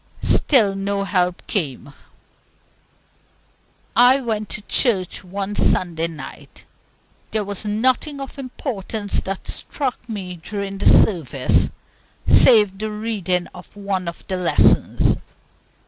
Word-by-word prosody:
Still 220 -9 +4
no 200 0 -2
help 180 -2 -1
came. 145 - -3 2.0
I 250 +3 +6
went 220 -5 -3
to 215 - -5
a - - -31
church 200 -8 0
one 195 +2 -4
Sunday 170 -4 +1
night. 160 -2 -11 0.6
There 215 -1 -1
was 205 +1 -6
nothing 255 +7 0
of 275 +1 -8
importance 220 -6 -4
that 195 0 -6
struck 265 -4 -4
me 185 -5 -5
during 195 +3 -6
the - - +1
service, 145 -9 +3 0.6
save 210 -6 +5
the 215 0 -3
reading 210 -5 -2
of 180 +2 -14
one 195 -3 -3
of 170 - -7
the 185 - -2
lessons. 180 -2 +3
200 Hz, 115 wpm, -21 LUFS, 180-220 Hz, 2.0 s, I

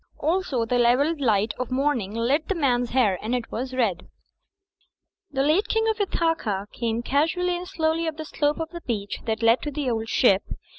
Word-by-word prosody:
Also 310 -7 0
the 245 +2 0
level 250 +7 +3
light 215 -4 +2
of 255 - -3
morning 255 -6 0
lit 270 +7 +1
the 390 - -1
man's 245 -6 +1
hair, 220 -8 +2
and 230 +3 -1
it 240 -2 -4
was 255 +3 -3
red. 200 -9 0 1.2
The 270 -2 0
late 330 +9 +2
King 445 0 +1
of 440 -1 -1
Ithaca 325 - 0
came 230 0 -2
casually 330 +7 +1
and 355 +1 -6
slowly 325 -1 0
up 315 -1 -3
the 315 - -5
slope 295 0 0
of 325 0 -3
the 345 -1 -7
beach 205 -7 -3
that 220 0 -2
led 230 +2 +4
to 295 - -3
"The 285 -3 -2
Old 225 -1 -2
Ship." 200 -6 +4
265 Hz, 195 wpm, -25 LUFS, 230-320 Hz, 1.2 s, led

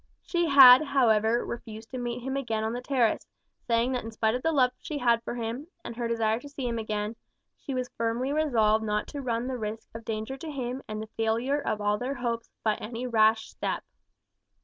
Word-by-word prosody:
She 345 -1 0
had, 265 -2 +10
however, 235 -5 +2
refused 225 -1 -8
to 255 - -4
meet 240 0 -3
him 265 +1 -3
again 225 -5 -1
on 220 +1 -1
the 245 - -4
terrace, 250 -4 +1 0.4
saying 235 +2 +2
that 250 -1 -2
in 225 - -6
spite 220 0 0
of 250 - -2
the 325 - +1
love 255 -5 +3
she 305 - -5
had 235 -3 +3
for 235 - -5
him, 235 +5 -4 0.2
and 235 - -6
her 235 0 -2
desire 225 -1 +1
to 285 - -11
see 275 -3 -4
him 235 -1 -2
again, 215 0 -3 0.4
she 275 - -6
was 255 -1 -1
firmly 230 +4 -1
resolved 225 -8 +2
not 210 -1 -1
to 285 - -5
run 235 -2 -1
the 255 -1 -3
risk 215 0 -5
of 225 0 -8
danger 220 +4 -4
to 315 +4 -7
him 260 -2 -4
and 215 0 -4
the 220 - -11
failure 230 +6 +1
of 210 - -2
all 205 0 +1
their 260 +3 -3
hopes, 235 -2 -3
by 215 -1 +1
any 235 +3 -5
rash 220 -2 +3
step. - - -3
235 Hz, 215 wpm, -28 LUFS, 220-260 Hz, 0.4 s, had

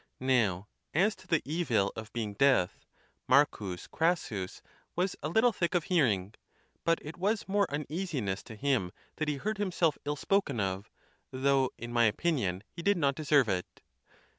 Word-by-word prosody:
Now, 110 -8 +1 0.3
as 200 +6 +3
to - - -17
the 165 -4 +2
evil 130 - 0
of 110 -1 -7
being 110 -3 -3
deaf. 105 -5 +2 0.4
M. 145 - +7 0.5
Crassus 155 - -1 0.3
was 180 +2 0
a - - -2
little 220 +7 +4
thick 175 -1 -1
of 175 - +2
hearing; 110 - +1 0.5
but 165 0 +3
it 150 +2 -8
was 205 +4 0
more 200 0 +2
uneasiness 145 - -3
to 110 - -9
him 120 -7 0 0.3
that 155 - -1
he 150 - 0
heard 215 +7 -3
himself 180 -6 +1
ill 145 +1 -1
spoken 150 - 0
of; 95 0 -2 0.4
though, 135 0 +2
in 120 0 -7
my 120 -1 +4
opinion, 105 - 0
he 170 - -8
did 200 +2 +3
not 140 -4 +2
deserve 145 -4 +3
it. 95 -3 -3
140 Hz, 165 wpm, -30 LUFS, 110-170 Hz, 0.5 s, M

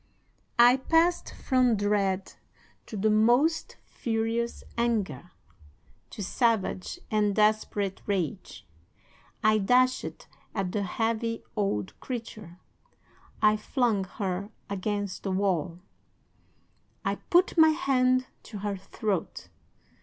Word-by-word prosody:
"'I 240 +2 +7
passed 335 +2 +3
from 255 -3 +2
dread 200 -2 0 0.5
to 215 - -6
the 215 +2 +2
most 245 +10 +2
furious 230 +1 -2
anger, 200 - -1 0.8
to 205 - -6
savage 225 - 0
and 210 -2 +2
desperate 210 -2 +1
rage. 190 -2 -3 0.8
I 215 0 +4
dashed 255 +5 +1 0.3
at 195 -3 -1
the 205 - -1
heavy 225 +3 -2
old 195 - -2
creature. 220 -8 -7 0.9
I 215 0 +6
flung 220 -3 0
her 195 0 -2 0.2
against 200 0 -3
the 195 - -3
wall. 185 -4 0 1.3
I - - 0
put 360 +1 +4
my 320 -2 +7
hand 255 -6 +2 0.2
to 215 - -9
her 200 0 -3
throat. 195 -1 -4
215 Hz, 100 wpm, -28 LUFS, 195-240 Hz, 1.3 s, I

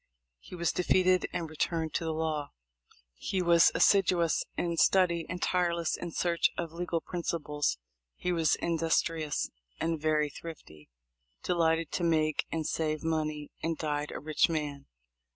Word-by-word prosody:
He 180 - -11
was 170 -1 0
de - - -1
feated, 185 0 +3
and 170 - -3
returned 160 +1 -2
to - - -1
the 160 - -1
law. 155 -2 -2 0.6
He 185 - -3
was 170 -1 +6
assiduous 180 -4 +3
in 170 -1 -1
study 170 -3 +3
and 180 - -4
tireless 170 -3 +1
in 175 - -5
search 170 +1 +1
of 170 -2 -3
legal 170 0 -2
principles. 150 - -2 0.4
He 180 - -2
was 165 -3 +2
industrious 165 -2 0 0.3
and 165 -2 -1
very 155 -1 +1
thrifty, 105 - -11 0.5
delighted 165 -2 +1
to 175 - -2
make 155 -2 +1
and 160 -1 -2
save 155 0 -1
money, 155 -2 -2
and 165 -1 -1
died 150 -1 -2
a - - -5
rich 155 +3 +2
man. 145 -3 -3
165 Hz, 150 wpm, -30 LUFS, 155-170 Hz, 0.6 s, was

